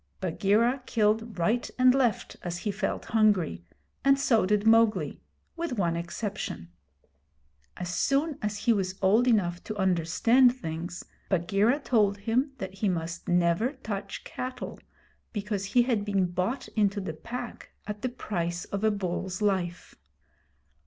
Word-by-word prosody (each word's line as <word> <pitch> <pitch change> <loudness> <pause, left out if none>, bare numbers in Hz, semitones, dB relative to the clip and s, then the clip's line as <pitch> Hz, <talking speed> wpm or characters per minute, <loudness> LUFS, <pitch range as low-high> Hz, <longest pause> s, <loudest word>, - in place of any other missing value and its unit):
Bagheera 210 +8 +2
killed 220 0 +1
right 215 +8 +1
and 255 0 +6
left 255 -5 0
as 175 -1 -4
he 205 +4 -2
felt 200 - -3
hungry, 195 - +3 0.4
and 275 +1 +4
so 230 -8 +3
did 210 +1 +1
Mowgli 220 -8 +3 0.3
with 335 -4 -3
one 170 -4 +1
exception. 170 - -4 1.1
As 180 0 -4
soon 280 - +1
as 210 0 -2
he 230 +3 +3
was 190 -2 -2
old 220 +6 +4
enough 180 -7 +2
to 215 - -5
understand 195 +8 +4
things, 170 -5 -6 0.2
Bagheera 200 - +2
told 210 -7 +2
him 240 +7 0
that 190 -5 -6
he 195 +1 0
must 170 -1 -3
never 175 - +2
touch 215 -7 -6
cattle 255 0 -6 0.5
because 205 -2 -2
he 245 +5 +3
had 235 -4 0
been 200 -2 +1
bought 180 +8 -2
into 205 -2 +1
the 190 -5 -4
Pack 240 +9 -7 0.2
at 210 0 -5
the 255 - -1
price 175 -8 -3
of 200 +1 -4
a 220 - +5
bull's 185 -2 -3
life. 190 -4 -1
205 Hz, 145 wpm, -28 LUFS, 180-235 Hz, 1.1 s, and